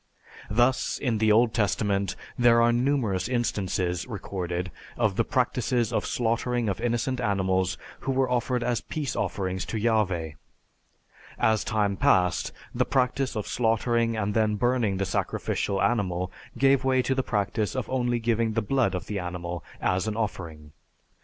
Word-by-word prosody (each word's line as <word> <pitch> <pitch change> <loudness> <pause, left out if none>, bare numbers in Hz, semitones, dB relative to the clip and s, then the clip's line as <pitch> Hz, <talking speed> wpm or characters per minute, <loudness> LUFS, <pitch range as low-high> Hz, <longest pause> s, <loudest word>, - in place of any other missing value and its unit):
Thus, 120 +4 +2
in 120 -6 -1
the 110 0 +4
Old 115 +1 +4
Testament, 100 -3 0 0.2
there 120 -1 +5
are 120 0 +5
numerous 120 -7 +1
instances 95 -7 -1
recorded 90 -5 -4 0.3
of - - +1
the - - +2
practices 120 -2 0
of - - 0
slaughtering 120 0 0
of 100 - -3
innocent 120 +2 0
animals 95 -4 +1 0.2
who 135 - -2
were 130 0 +2
offered 125 0 0
as 120 -2 0
peace 150 -4 -4
offerings 95 -2 -2
to 115 - -3
Yahveh. 95 -9 0 1.0
As 110 -1 +2
time 105 -3 0
passed, 90 -1 +2 0.2
the - - +2
practice 130 0 0
of 105 - -2
slaughtering 115 0 +1
and 105 -1 -1
then 110 -1 +2
burning 120 -3 +1
the 95 - 0
sacrificial 95 +2 -1
animal 95 -4 0 0.3
gave 135 -1 +4
way 130 -1 +2
to 135 - +1
the 130 - +1
practice 105 -1 -1
of 130 -4 -2
only 120 -2 0
giving 115 -1 0
the 115 0 0
blood 120 -4 +1
of 90 -1 -4
the 105 -1 -3
animal 90 -1 -5 0.2
as 95 +3 0
an 110 0 -2
offering. 80 -8 -4
110 Hz, 155 wpm, -26 LUFS, 95-120 Hz, 1.0 s, there